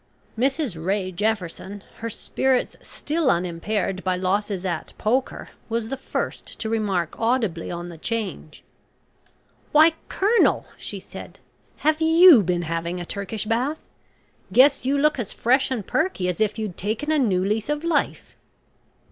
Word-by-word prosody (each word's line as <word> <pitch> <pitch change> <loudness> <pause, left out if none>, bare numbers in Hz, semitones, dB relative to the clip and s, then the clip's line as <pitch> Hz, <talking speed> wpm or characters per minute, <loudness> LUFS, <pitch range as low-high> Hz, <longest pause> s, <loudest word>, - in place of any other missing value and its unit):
Mrs 255 - -1
Ray 190 0 -1
Jefferson, 200 0 -3
her 230 - -4
spirits 260 +3 0
still 310 -1 -2
unimpaired 185 +2 -1
by 185 -1 +1
losses 190 +1 -1
at 170 -4 -3
"poker," 250 +4 -1 0.2
was 225 -1 -2
the 270 - -2
first 270 - -5
to 220 - -3
remark 200 -7 -1
audibly 225 -8 0
on 175 0 -5
the 165 -2 -11
change. 200 -8 -4 1.1
"Why, 315 +1 +6 0.2
Colonel!" 425 +4 +3
she - - -7
said. - - -11 0.5
"Have 310 +1 +3
you 325 - +8
been 175 -2 -1
having 165 +2 -3
a 175 - -5
Turkish 200 +3 -4
Bath? 250 +8 0 0.7
Guess 260 +4 +5
you 280 +1 +2
look 300 -1 +2
as 225 - -3
fresh 260 +3 +2
and 240 -7 -3
perky 310 - 0
as 180 +2 -2
if 215 0 +1
you'd 215 -5 -4
taken 220 +10 -2
a 310 - +3
new 190 -8 +2
lease 215 +5 -1
of 295 +1 -1
life." 335 -3 -1
220 Hz, 150 wpm, -23 LUFS, 185-270 Hz, 1.1 s, you